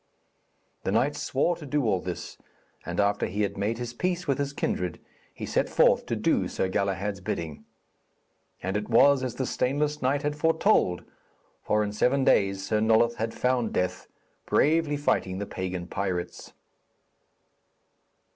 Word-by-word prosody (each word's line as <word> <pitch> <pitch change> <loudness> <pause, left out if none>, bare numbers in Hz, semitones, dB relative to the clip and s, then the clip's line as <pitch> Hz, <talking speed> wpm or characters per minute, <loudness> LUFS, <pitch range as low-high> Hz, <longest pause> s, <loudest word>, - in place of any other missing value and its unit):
The - - -1
knight - - +2
swore 175 - 0
to 165 - -11
do 145 +1 0
all 95 -4 +2
this, 90 -1 -6 0.5
and 85 +2 -3
after 100 0 +2
he 105 +3 -1
had 100 - -2
made 105 +3 -1
his 120 0 -5
peace 175 +5 -2
with 140 0 +1
his 140 0 -1
kindred, 90 - -2 0.3
he - - -7
set - - 0
forth - - +3
to - - -1
do - - +1
Sir 95 - -2
Galahad's 100 +1 -1
bidding. 80 -4 -4 1.0
And 95 +2 -2
it 105 +1 -2
was 135 +3 +5
as 125 -3 -3
the 130 - -2
stainless 145 +5 -1
knight 140 +3 +1
had 150 0 -1
foretold, 160 - +2 0.6
for 105 0 +1
in 105 0 -3
seven 130 +6 +2
days 95 -4 +2
Sir 105 +1 +1
Nulloth 115 +2 +3
had 115 -1 -2
found 125 -3 0
death, 90 0 -1 0.4
bravely 155 -1 +2
fighting 95 -9 0
the 100 - -3
pagan 90 -2 -4
pirates. 90 -1 -4
110 Hz, 155 wpm, -27 LUFS, 95-140 Hz, 1.0 s, was